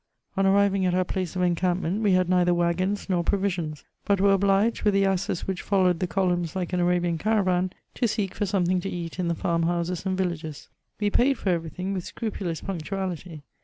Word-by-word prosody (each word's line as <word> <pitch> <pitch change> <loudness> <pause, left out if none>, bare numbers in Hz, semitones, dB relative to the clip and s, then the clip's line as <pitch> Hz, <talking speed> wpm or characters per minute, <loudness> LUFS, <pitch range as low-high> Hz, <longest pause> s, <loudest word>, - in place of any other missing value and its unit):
On 195 0 +2
arriving 195 0 +3
at 180 - +1
our 185 - +3
place 185 -1 -3
of 180 - 0
encampment, 180 +2 0
we 205 -3 +3
had 185 -1 +3
neither 180 -1 +3
waggons 180 +4 0
nor 180 -3 +1
provisions, 175 -6 -1 0.2
but 200 -2 +1
were 200 0 +5
obliged, 195 +3 +2
with 210 -2 +2
the 195 0 +4
asses 190 -2 -1
which 190 -2 -3
followed 185 -4 +2
the 185 - 0
columns 175 -2 0
like 185 -1 -3
an 180 - +1
Arabian 175 -1 +1
caravan, 185 -4 +1 0.2
to 240 - +1
seek 210 -3 -2
for 205 - -2
something 185 -2 +1
to 195 - -4
eat 175 0 -5
in 180 - 0
the 170 - 0
farm 170 +1 0
houses 170 +1 -1
and 190 -1 -1
villages. 165 -5 -3 0.3
We 205 -1 +1
paid 265 +5 +3
for 195 - -2
every 165 -2 -1
thing 185 +4 -4
with 185 -2 -3
scrupulous 190 -7 -4
punctuality. 180 -3 -4
185 Hz, 205 wpm, -26 LUFS, 175-195 Hz, 0.3 s, were